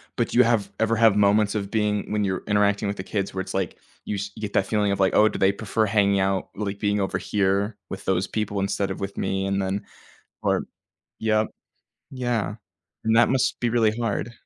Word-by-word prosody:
but, 120 - 0
do - - -2
you 125 - +8
have 110 -4 +1
ever 110 0 +2
have 110 -2 +5
moments 105 +1 +3
of 100 -2 -2
being 105 -1 0
when 105 -1 +1
you're 95 -2 -1
interacting 105 0 +2
with 100 - -3
the 95 - -4
kids 100 0 -3
where 95 - -2
it's, - - -6
like, 95 -3 -2 0.3
you 105 - -2
sh 100 +1 -4
you - - -10
get 105 -1 -4
that 95 - +2
feeling 105 -1 +1
of, 100 - -1
like, 95 - +3
"Oh, 110 - +6
do - - -5
they 95 +1 +4
prefer 110 +2 -1
hanging 100 -1 +2
out 95 0 0
like, 100 -1 -4
being 105 0 +1
over 95 - -1
here 100 +1 0
with 95 0 -7
those 95 0 +1
people 105 -2 -2
instead 100 0 -1
of - - -5
with 100 0 -5
me?" 95 0 -1
and 100 0 0
then 95 +2 -2 0.6
or - - +1 0.5
Yep, 110 -1 +1 0.6
yeah, 120 -5 -1 0.5
and 110 0 +2
that 120 - +5
must 130 -1 +1
be 120 - +1
really 115 -2 +3
hard. 115 -1 -2
100 Hz, 225 wpm, -24 LUFS, 100-110 Hz, 0.6 s, you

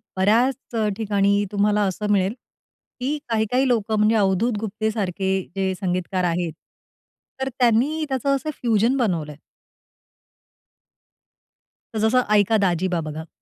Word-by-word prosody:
बऱ्याच 235 +7 +1 0.2
ठिकाणी 200 -1 +1
तुम्हाला 210 +1 +2
असं 210 +3 -2
मिळेल, 195 0 +2 0.7
की 280 +4 -1
काही-काही 230 +4 +1
लोकं, 220 -3 +1
म्हणजे 215 +2 +3
अवधूत 205 +3 +2
गुप्तेसारखे 210 -3 -2 0.3
जे 190 -1 0
संगीतकार 185 0 -1
आहेत, 170 -1 -1 0.9
तर 265 - -1
त्यांनी 255 +7 +2
त्याचं 275 +1 +1
असं 275 +3 -4
फ्यूजन 230 +2 +2
बनवलंय. 165 - -1 2.6
तर 220 - -2
जसं, 240 +4 +3
"ऐका 210 +2 +4
दाजीबा" 175 0 0
बघा. 155 +1 -6
210 Hz, 110 wpm, -22 LUFS, 190-235 Hz, 2.6 s, ऐका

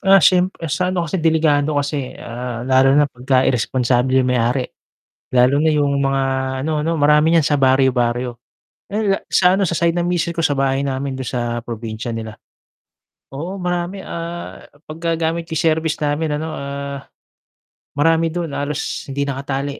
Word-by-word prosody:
Ah, 195 0 +6
siyempre 180 -3 +2
sa 180 0 0
ano 180 -2 -1
kasi 170 +2 -2
delikado 155 -2 +2
kasi, 140 -2 -2
ah, 120 0 -6
lalo 135 +1 +4
na 145 - +5
pagka 130 +1 +1
iresponsable 125 +1 +1
yung 125 - 0
may-ari. 125 +2 +1 0.7
Lalo 125 +3 +4
na 160 - +3
yung 145 -1 +1
mga 135 0 +1 0.4
ano 155 0 -1
'no, 165 - +1
marami 150 +2 +4
niyan 165 - +5
sa 145 - +2
baryo-baryo, 125 -2 +2 0.5
ay 205 -2 0
sa 180 0 +4
ano 200 - +1
sa 170 -2 0
side 170 0 +1
ng 175 - 0
misis 170 -1 -1
ko 165 - -1
sa 145 - +2
bahay 135 0 +1
namin 135 0 -2
dun 130 - -5
sa 120 -1 -3
probinsya 115 0 -5
nila. 110 -1 -6 1.0
Oo 170 +8 -5
marami 180 +1 -3
ah, 170 +1 -6 0.3
'pag 155 +1 -8 0.2
gagamit 165 +1 -2
yung 160 +2 -1
service 160 0 +1
namin 150 +1 -1
ano, 160 +1 -4
ah, 140 0 -5 1.0
marami 165 +2 +3
dun 170 -2 -4
halos 145 +1 -3
hindi 140 +1 -1
nakatali 140 0 -3
145 Hz, 165 wpm, -19 LUFS, 130-165 Hz, 1.0 s, Ah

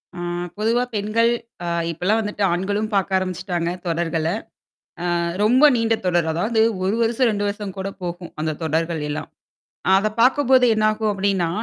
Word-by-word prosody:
அ - - -7 0.4
பொதுவா 230 +3 +1
பெண்கள், 215 +3 +2 0.3
அ - - -4 0.3
இப்பலாம் 180 +7 +1
வந்துட்டு 210 -1 -3
ஆண்களும் 200 +4 -1
பாக்க 195 -1 +1
ஆரம்பிச்சுட்டாங்க 180 -2 -2 0.2
தொடர்கள. 165 -1 -1 0.9
அ - - +2 0.3
ரொம்ப 250 +6 +4
நீண்ட 230 -1 +2
தொடர். 175 -2 +2
அதாவது 215 +8 +1 0.2
1 195 +3 +1
வருஷம், 235 +2 +2
2 205 -1 -1
வருஷம் 200 -1 -5
கூட 190 +1 -3
போகும். 175 0 -5
அந்த 155 0 -1
தொடர்கள் 160 +1 -1
எல்லாம். 150 +1 -4 0.7
அத 205 +2 +2
பாக்கும்போது 260 0 +5
என்னாகும் 215 0 +1
அப்படின்னா, 195 -3 0
200 Hz, 145 wpm, -22 LUFS, 175-220 Hz, 0.9 s, பாக்கும்போது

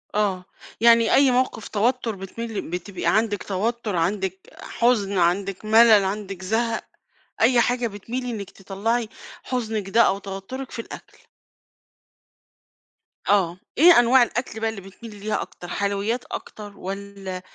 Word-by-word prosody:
آه، 195 -3 0 0.4
يعني 230 -1 +5
أي 275 -2 +5
موقف 245 -3 0
توتر 230 +1 0
بتميلي 215 +3 -5
بتبقى 180 +1 -6
عندِك 210 +3 +1
توتر 215 +2 -2
عندِك 190 +2 -1 0.2
حزن 210 -5 +1
عندِك 190 +3 0
ملل 220 -2 +6
عندِك 195 -1 -4
زهق، 225 +3 0 0.6
أي 240 +2 +5
حاجة 245 0 +1
بتميلي 240 +5 -5
إنك 205 -4 -6
تطلعي 215 +4 -2 0.3
حزنِك 220 -5 -3
ده 230 +3 +5
أو 195 - +2
توترِك 200 +7 -7
في - - -8
الأكل. 230 - -9 2.1
آه، 185 -4 +3 0.2
إيه 335 -1 +8
أنواع 245 +1 +6
الأكل 240 -1 -3
بقى 225 - 0
اللي 220 -3 -7
بتميلي 205 +3 -12
ليها 210 +1 -2
أكتر 175 - -9
حلويات 200 +6 -1
أكتر 205 -2 -8
والّا 195 -1 -6
210 Hz, 130 wpm, -23 LUFS, 195-235 Hz, 2.1 s, إيه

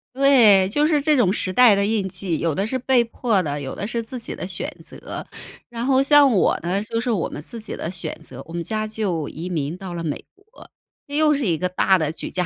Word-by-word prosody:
对， 240 -9 +6
就 290 +10 +1
是 305 -1 +2
这 300 +1 +2
种 230 -9 +3
时 185 -2 -3
代 250 -1 +7
的 200 0 +1
印 210 -2 0
记， 185 -3 -3
有 165 -2 0
的 195 +7 -1
是 260 - -1
被 255 0 +3
迫 230 -3 0
的， 145 -4 -3
有 135 - -5
的 200 - -5
是 235 0 -3
自 250 +3 -7
己 230 - -6
的 - - -6
选 185 -1 -5
择。 - - -8 0.4
然 235 0 -4
后 265 0 +3
像 290 0 +6
我 195 - +2
呢， 185 +4 -1
就 230 +1 -3
是 245 +2 -3
我 210 -8 0
们 - - -7
自 230 +9 -9
己 220 - -7
的 160 - -4
选 180 -1 -5
择， 160 - -10
我 165 - -13
们 170 - -3
家 215 +4 -3
就 200 -8 -3
移 165 +3 -7
民 160 -2 -3
到 185 -2 -7
了 170 -1 -5
美 150 -3 -4
国。 400 +3 -18 0.4
这 285 - -6
又 305 -1 +4
是 280 -3 -1
一 170 -5 +1
个 180 +3 -1
大 190 +1 +3
的 155 -3 -1
举 160 - -7
家 180 -1 -2
205 Hz, 275 characters per minute, -22 LUFS, 180-250 Hz, 0.4 s, 代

